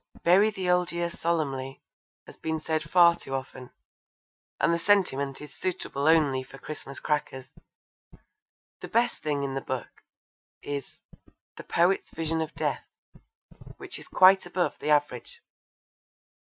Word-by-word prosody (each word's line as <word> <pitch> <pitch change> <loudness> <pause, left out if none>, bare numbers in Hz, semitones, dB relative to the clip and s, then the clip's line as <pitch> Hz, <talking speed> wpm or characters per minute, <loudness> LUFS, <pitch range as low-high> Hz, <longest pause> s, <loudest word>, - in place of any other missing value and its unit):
'Bury 190 +5 +5
the 190 -3 -4
Old 180 0 +2
Year 170 0 -2
Solemnly' 140 -6 -2 0.5
has - - -13
been 160 0 -2
said 155 0 -1
far 175 -1 +7
too 135 -5 -6
often, 130 -1 -7 0.9
and - - +3
the 170 - 0
sentiment 155 -9 +1
is 150 -2 -10
suitable 155 -5 -3
only 150 -5 +4
for 130 +1 -12
Christmas 140 -1 -8
crackers. 135 -3 -3 1.3
The - - -7
best 235 +1 +1
thing 145 -2 -1
in 135 -1 -3
the 135 - -2
book 130 -3 -6 0.6
is 145 -2 -5 0.6
The - - -9
Poet's 175 +3 +1
Vision 160 0 -2
of 160 0 -5
Death, - - -2 0.9
which - - -8
is - - -12
quite 190 0 +5
above 175 0 -1
the - - -3
average. 145 -5 0
155 Hz, 140 wpm, -27 LUFS, 135-175 Hz, 1.3 s, far